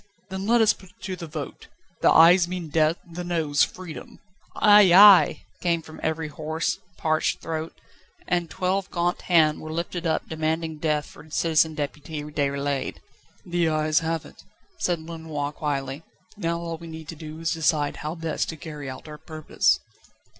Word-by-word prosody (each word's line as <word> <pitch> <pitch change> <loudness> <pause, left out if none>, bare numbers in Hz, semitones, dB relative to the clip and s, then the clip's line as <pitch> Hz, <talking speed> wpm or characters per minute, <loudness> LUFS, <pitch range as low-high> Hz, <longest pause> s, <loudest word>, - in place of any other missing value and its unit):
"Then 190 +1 -4
let 235 +1 +4
us 220 - +5
put 190 - -17
it - - -28
to 185 0 -4
the 170 -2 -8
vote. 150 -2 -7 0.3
The - - +5
Ayes 170 +2 +7
mean 175 -3 -5
death, 155 +2 +2
the 175 +1 -7
Noes 160 -4 0
freedom." 180 -4 -3 0.4
"Ay, 205 -3 +7
ay!" 195 +1 +8 0.2
came 170 -2 0
from 155 - -12
every 160 0 -1
hoarse, 155 +2 -3 0.2
parched 155 -1 0
throat; 160 0 -5 0.5
and 175 -2 0
twelve 185 +4 -1
gaunt 175 0 -1
hands 160 -4 +3
were 155 - -7
lifted 170 +1 -3
up 160 - -1
demanding 160 0 -2
death 150 -2 0
for 155 - -15
Citizen 160 0 +2
Deputy 150 +1 -5
Déroulède. 140 -2 -2 0.5
"The 175 -2 +1
Ayes 155 0 +2
have 165 0 -2
it," - - -15 0.4
said 175 - 0
Lenoir 160 -3 -5
quietly, 140 -2 -3 0.3
"Now 170 -4 -1
all 165 -1 -5
we 170 - -10
need 160 -1 -8
do 155 0 -8
is 165 0 -1
to 165 - -3
decide 150 -2 +1
how 155 +2 -4
best 165 -2 -2
to 160 - -6
carry 150 -3 -7
out 130 +4 -9
our 150 -1 -9
purpose." 155 -2 +1
160 Hz, 170 wpm, -25 LUFS, 155-170 Hz, 0.5 s, ay